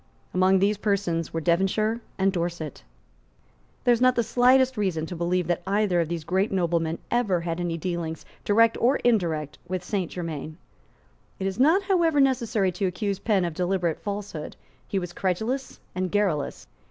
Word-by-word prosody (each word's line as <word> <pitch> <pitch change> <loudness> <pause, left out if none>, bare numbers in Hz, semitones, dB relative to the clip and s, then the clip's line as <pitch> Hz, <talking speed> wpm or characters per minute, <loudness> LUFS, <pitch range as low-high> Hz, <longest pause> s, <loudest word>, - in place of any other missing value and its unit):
Among 185 +1 +4
these 200 +2 +2
persons 195 -6 0
were 165 - -2
Devonshire 195 +7 +1 0.2
and 195 0 +2
Dorset. 170 -4 -3 1.0
There 245 - +5
is 235 - -1
not 255 0 +5
the 235 - +2
slightest 255 +2 +4
reason 185 -7 -1
to 175 - -6
believe 175 +1 0
that 175 +1 -1
either 195 -3 +2
of 165 - -1
these 170 -2 -3
great 190 +5 0
noblemen 170 -3 0
ever 210 -8 +1
had 165 0 -3
any 170 -1 -2
dealings, 165 -1 -4 0.2
direct 230 +2 +4
or 255 +4 +4
indirect, 165 - +1
with 185 0 -3
Saint 185 -2 -2
Germains. 160 -3 -5 0.8
It 190 - -4
is 195 +3 -2
not, 325 +9 +5
however, 340 -6 +2
necessary 235 -8 +2
to 185 +2 -1
accuse 200 +2 -2
Penn 200 -5 +1
of 170 - -3
deliberate 175 -1 0
falsehood. 200 -6 -5 0.3
He 200 - -2
was 175 -2 -3
credulous 220 +10 -2
and 185 0 -2
garrulous. 190 -9 0
190 Hz, 165 wpm, -25 LUFS, 170-215 Hz, 1.0 s, There